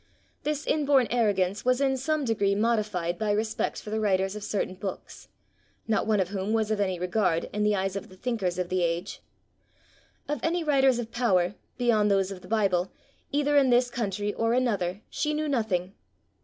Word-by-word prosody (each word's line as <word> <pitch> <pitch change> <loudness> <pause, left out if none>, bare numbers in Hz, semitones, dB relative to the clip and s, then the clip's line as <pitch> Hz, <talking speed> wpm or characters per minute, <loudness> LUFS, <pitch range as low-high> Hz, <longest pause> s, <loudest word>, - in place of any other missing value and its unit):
This 300 0 -2
inborn 285 -4 +3
arrogance 205 -4 +1
was 255 0 +2
in 270 -1 +2
some 295 +2 -1
degree 200 -4 +1
modified 210 -6 0
by 215 -1 -1
respect 215 +1 -1
for 210 - -9
the 220 - 0
writers 195 -2 +1
of 210 - -6
certain 200 -3 -2
books 190 0 -7 0.6
not 220 -1 +1
one 215 -2 +3
of 185 -2 0
whom 200 +1 -2
was 220 -1 +1
of 215 - 0
any 185 -3 0
regard 180 -1 0
in 210 - -1
the 210 0 +3
eyes 195 0 -1
of 195 - -5
the 185 - -14
thinkers 195 -5 -2
of 180 -1 -2
the 185 0 0
age. 170 +2 -2 1.1
Of 295 -2 -2
any 340 +1 0
writers 270 -4 +3
of 230 -1 -5
power, 195 -7 +2 0.2
beyond 220 -4 +3
those 195 -1 +2
of 185 -2 -8
the - - -13
Bible, 195 -5 +1 0.4
either 290 0 +1
in 275 -2 +5
this 245 0 +3
country 205 -3 -2
or 225 0 0
another, 205 -7 0
she 300 0 -1
knew 305 0 -1
nothing. 205 -9 -1
210 Hz, 190 wpm, -27 LUFS, 190-245 Hz, 1.1 s, in